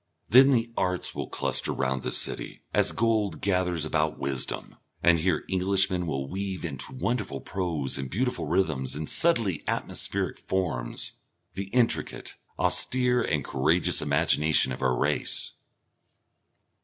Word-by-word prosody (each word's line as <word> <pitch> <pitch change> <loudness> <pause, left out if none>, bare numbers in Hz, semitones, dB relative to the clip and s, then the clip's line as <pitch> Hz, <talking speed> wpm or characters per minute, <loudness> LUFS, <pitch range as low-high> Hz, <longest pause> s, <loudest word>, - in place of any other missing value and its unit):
Then 130 +4 +7
the 115 -3 +1
arts 90 -1 0
will - - -5
cluster - - 0
round 65 -1 -1
this - - +3
city, - - 0
as - - +4
gold 110 -2 0
gathers 90 -4 0
about 75 0 0
wisdom, 65 -1 -4 0.3
and 85 -1 +5
here 85 -1 0
Englishmen 95 -1 +2
will 70 -3 -3
weave 95 +1 -4
into 85 - -5
wonderful 120 - -2
prose 80 -9 -2
and 65 -1 -5
beautiful 125 - -2
rhythms 75 -9 0
and 75 +1 -4
subtly 115 - +2
atmospheric - - -1
forms, 85 -11 -2 0.4
the 100 - -4
intricate, 115 +4 0 0.2
austere 125 -1 +2
and 75 - -1
courageous - - +2
imagination 75 -3 +2
of 65 - -6
our 65 -2 +1
race. - - -1
90 Hz, 130 wpm, -27 LUFS, 75-105 Hz, 0.4 s, Then